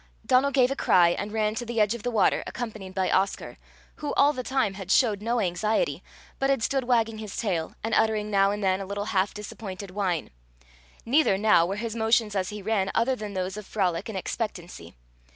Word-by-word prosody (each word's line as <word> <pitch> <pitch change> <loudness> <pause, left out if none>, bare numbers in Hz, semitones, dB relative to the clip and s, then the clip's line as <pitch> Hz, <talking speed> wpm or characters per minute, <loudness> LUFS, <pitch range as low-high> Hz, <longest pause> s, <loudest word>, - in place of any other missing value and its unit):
Donal 265 +1 +4
gave 265 -2 +3
a - - -1
cry, 175 -9 +4
and 205 +4 -3
ran 215 -1 0
to 235 +2 -4
the 235 -1 -3
edge 210 +1 +3
of 235 - -6
the 245 - -2
water, 225 -4 +2
accompanied 215 -6 -6
by 190 -1 0
Oscar, 195 +1 -1 0.4
who, 295 - -4
all 290 +1 +5
the 255 - -4
time, 255 -5 0
had 190 -1 -9
showed 215 -6 +3
no 235 +2 0
anxiety, 215 - 0 0.4
but 270 - +1
had 270 -4 +1
stood 270 0 0
wagging 225 -3 +1
his 215 -2 -7
tail, 175 -8 -2
and 225 0 -2
uttering 215 -1 +1
now 195 -1 +4
and 205 0 -3
then 190 0 +1
a 195 - -6
little 200 +1 -3
half 190 +1 +2
disappointed 200 -2 -8
whine; 185 -5 -2 0.7
neither 255 -5 +3
now 200 -5 +4
were 195 - -2
his 225 +1 -4
motions 225 -1 +2
as 185 -1 -1
he 210 -1 -7
ran 200 -2 0
other 255 +3 +2
than 210 -4 -7
those 185 +1 -3
of 210 - -8
frolic 190 0 -1
and 210 - -4
expectancy. 180 - -5
210 Hz, 210 wpm, -26 LUFS, 195-230 Hz, 0.7 s, all